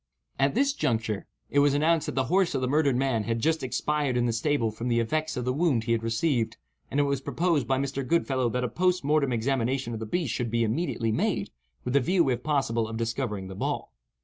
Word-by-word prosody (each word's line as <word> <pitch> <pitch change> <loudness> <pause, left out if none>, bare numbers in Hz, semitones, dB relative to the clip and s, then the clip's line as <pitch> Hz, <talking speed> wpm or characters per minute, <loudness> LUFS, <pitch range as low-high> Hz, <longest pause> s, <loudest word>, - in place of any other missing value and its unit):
At 135 +4 +2
this 275 +3 +3
juncture, 110 - -1 0.2
it 145 - +3
was 145 0 +4
announced 155 +1 +2
that - - -4
the 135 - +2
horse 180 +5 +2
of - - 0
the 130 - 0
murdered 140 -1 +2
man 125 -4 0
had 115 -1 0
just 160 +5 +1
expired 140 0 -1
in 120 - +2
the 120 - +1
stable 115 -1 +1
from 115 +3 -5
the 120 -1 +2
effects 155 +6 -1
of 125 - -2
the 125 - +1
wound 145 -6 +1
he 115 - -2
had 115 -1 +2
received, 115 +1 0 0.3
and 140 - -1
it - - +5
was 140 -1 0
proposed 145 -1 0
by 135 - +2
Mr. 135 0 -2
Goodfellow 130 -3 +1
that 125 +2 -1
a - - +1
post 180 +7 +1
mortem 145 -2 +2
examination 125 +1 0
of 110 - -4
the 110 - -5
beast 160 -1 -1
should 120 -2 -2
be 115 +1 +1
immediately 115 -1 -1
made, 110 - -1 0.3
with 125 - -3
the 140 - +5
view, 170 +4 +2
if 125 -1 -1
possible, 125 -7 0
of 115 0 -5
discovering 115 -4 -2
the 95 - -7
ball. 95 - -3
130 Hz, 235 wpm, -27 LUFS, 115-150 Hz, 0.3 s, it